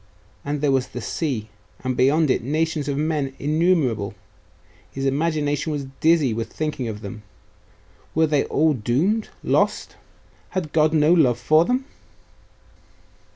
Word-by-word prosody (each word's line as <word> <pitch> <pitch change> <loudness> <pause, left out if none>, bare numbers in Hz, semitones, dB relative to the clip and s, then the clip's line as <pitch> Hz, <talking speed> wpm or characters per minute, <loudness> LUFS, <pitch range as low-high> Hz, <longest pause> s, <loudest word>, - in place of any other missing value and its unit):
And 145 0 -3
there 145 -2 +2
was 130 -1 +1
the 125 - -7
sea.... 120 -4 -3 0.3
and 130 -1 -1
beyond 145 +3 +3
it, - - +1
nations 155 +3 -1
of 140 -1 -1
men 150 -3 -1
innumerable.... 145 - +1 0.7
His 135 0 -4
imagination 145 +1 0
was 145 -2 -3
dizzy 160 -7 +3
with 115 0 -4
thinking 150 -5 -3
of 105 -1 -6
them. 105 +1 -8 0.9
Were 160 +1 +4
they 150 -2 +1
all 155 +1 +2
doomed 145 - 0
lost?.... - - 0 0.6
Had 160 -5 -3
God 155 -1 +4
no 155 +1 +4
love 130 -9 +4
for 155 +7 +3
them? 255 +5 0
145 Hz, 140 wpm, -22 LUFS, 130-160 Hz, 0.9 s, Were